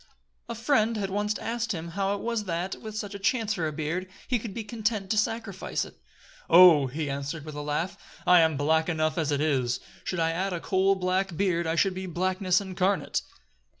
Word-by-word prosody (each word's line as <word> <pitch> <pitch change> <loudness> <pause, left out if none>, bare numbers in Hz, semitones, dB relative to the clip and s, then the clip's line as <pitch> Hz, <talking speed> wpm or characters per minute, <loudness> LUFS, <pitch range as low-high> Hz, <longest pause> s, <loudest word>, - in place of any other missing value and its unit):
A 235 - -3
friend 230 -2 +2
had 195 -2 -2
once 210 +1 0
asked 235 0 -2
him 170 -1 -5
how 195 +3 -1
it 200 - -6
was 230 -2 -2
that, 175 +1 -3
with 215 -1 -7
such 205 -2 -4
a 200 - -6
chance 220 +1 +1
for 170 -6 -1
a - - -2
beard, 160 +5 -3 0.2
he 245 -2 +1
could 215 -1 -6
be 225 +3 -5
content 215 -2 -2
to 215 - +1
sacrifice 220 -3 -2
it. - - -13 0.6
"Oh!" 170 -6 +8
he 150 +5 -3
had 140 -1 -2
answered 145 +2 -5
with 155 - -7
a 145 - -5
laugh, 150 +5 -2 0.3
"I 180 0 +7
am 160 -3 +3
black 160 +3 +2
enough 155 0 0
as 155 -2 0
it 145 0 +1
is; 130 -6 +1 0.2
should 180 - -3
I 165 0 +2
add 185 +3 -1
a 175 - -2
coal 190 +2 +2
black 185 -1 -1
beard, 170 -3 +1
I 160 - 0
should 190 +3 +2
be 185 0 -5
blackness 185 +1 +1
incarnate." 190 0 0
185 Hz, 215 wpm, -27 LUFS, 160-205 Hz, 0.6 s, Oh